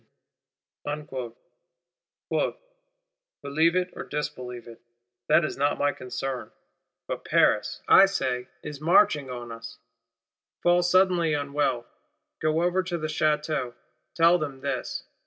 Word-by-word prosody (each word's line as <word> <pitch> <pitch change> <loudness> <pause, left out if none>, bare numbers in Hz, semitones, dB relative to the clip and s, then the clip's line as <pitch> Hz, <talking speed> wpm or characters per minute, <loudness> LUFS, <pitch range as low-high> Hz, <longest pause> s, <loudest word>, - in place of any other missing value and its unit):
'—'Believe - - -3
it 185 0 0
or - - -5
disbelieve 125 -5 -5
it, 115 - -12 0.5
that 170 - +5
is - - -4
not 145 +1 +1
my 145 0 +2
concern; 130 -1 -5 0.6
but - - -4
Paris, - - +2
I 195 +1 +8
say, 130 -10 -2 0.2
is 150 -1 -7
marching 155 -4 +4
on 120 -2 -6
us. 115 0 -9 0.9
Fall 175 0 +4
suddenly 175 -3 +3
unwell; 140 -4 -1 0.5
go 155 +2 +1
over 180 +1 +2
to 180 -2 -3
the 155 - -4
Château; 150 -4 0 0.4
tell 170 +1 +5
them 140 -4 -5
this. 135 -3 -3
155 Hz, 115 wpm, -26 LUFS, 135-180 Hz, 0.9 s, I